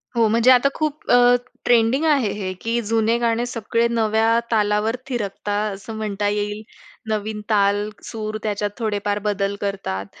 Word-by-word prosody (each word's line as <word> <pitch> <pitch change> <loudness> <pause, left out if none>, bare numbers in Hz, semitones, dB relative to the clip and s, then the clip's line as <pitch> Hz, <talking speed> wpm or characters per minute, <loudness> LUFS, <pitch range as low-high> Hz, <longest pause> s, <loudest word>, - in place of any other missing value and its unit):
हो. 230 -1 +4
म्हणजे 230 +3 +5
आता 255 +2 +5
खूप 305 -1 -3
अ, 245 - +7 0.5
ट्रेंडिंग 240 +4 +3
आहे 280 -8 +3
हे, 190 -3 -4
की 230 +1 -1
जुने 225 +1 +2
गाणे 235 0 +1
सगळे 230 -1 0
नव्या 225 0 +2
तालावर 210 +1 +1
थिरकतात, 210 -3 -2
असं 200 +3 -8
म्हणता 205 -1 -2
येईल. 210 +1 -2 0.5
नवीन 215 0 -2
ताल, 205 0 +2
सूर, 215 -1 -5
त्याच्यात 210 -1 -1
थोडेफार 205 -2 -1
बदल 200 0 -1
करतात. 195 - -3
215 Hz, 145 wpm, -21 LUFS, 205-230 Hz, 0.5 s, अ